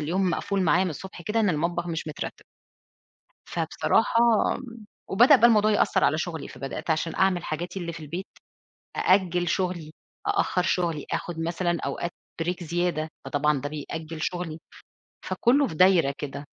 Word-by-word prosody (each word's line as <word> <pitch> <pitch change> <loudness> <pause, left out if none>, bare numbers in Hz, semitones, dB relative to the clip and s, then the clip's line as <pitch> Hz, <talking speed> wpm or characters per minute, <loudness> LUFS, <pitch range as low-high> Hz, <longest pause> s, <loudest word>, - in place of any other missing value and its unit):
اليوم 180 +5 0
مقفول 195 +3 -1
معايا 180 +3 +3
من 180 - -1
الصبح 175 +3 -8
كده 215 +5 0
إن 210 - +3
المطبخ 170 +2 -1
مش 165 -1 -3
مترتب. 155 - -6 1.0
فبصراحة 230 - +1 0.9
وبدأ 245 +9 +7
بقى 235 -1 +6
الموضوع 215 -2 +4
يأثر 205 - +2
على 155 - +3
شغلي، 165 -2 -4
فبدأت 135 +5 -7
عشان 160 +1 0
أعمل 190 -2 +2
حاجاتي 175 +5 -4
اللي 170 -1 -4
في 170 - -8
البيت، 170 +5 -6 0.7
أأجل 180 -2 +2
شغلي، 175 -4 -1 0.4
أأخر 400 - +1
شغلي، 170 -5 0
آخد 170 -2 -3
مثلًا 170 +1 -1
أوقات 170 +5 -3 0.3
break 180 +1 -3
زيادة، 170 -2 -1 0.2
فطبعًا 145 -2 +1
ده 145 - -3
بيأجل 155 +1 -6
شغلي، 170 -2 -3 0.7
فكله 270 +3 +3
في 160 - -7
دايرة 175 -5 +5
كده. 140 0 -6
175 Hz, 150 wpm, -26 LUFS, 155-185 Hz, 1.0 s, وبدأ